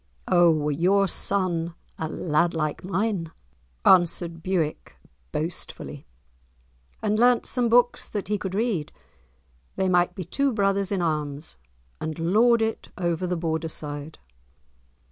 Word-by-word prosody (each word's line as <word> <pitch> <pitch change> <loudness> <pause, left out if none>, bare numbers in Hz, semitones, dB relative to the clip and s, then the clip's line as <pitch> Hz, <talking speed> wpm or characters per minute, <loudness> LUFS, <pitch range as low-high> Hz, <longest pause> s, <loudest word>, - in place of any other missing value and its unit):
"O 175 -1 +5
were 150 -2 +1
your 190 +6 +3
son 175 -3 0 0.2
a 160 - -2
lad 170 +2 0
like 155 -2 -2
mine," 190 -3 -1 0.5
answered 170 -2 +4
Bewick, 170 -4 -2 0.4
boastfully, 160 - -5 1.0
"and 215 0 +1
learnt 245 0 +4
some 245 -3 +1
books 245 +1 +3
that 205 -4 -4
he 210 0 -1
could 190 0 -4
read, 210 -8 -1 0.8
they 190 - 0
might 180 0 +2
be 185 - -4
two 275 - +1
brothers 195 -2 +1
in 190 -3 0
arms, 150 -2 -3 0.4
and 155 -1 -4
lord 225 +8 +3
it 220 0 -3
over 175 0 -1
the 180 0 -1
Borderside. 160 -2 -3
175 Hz, 125 wpm, -25 LUFS, 160-200 Hz, 1.0 s, O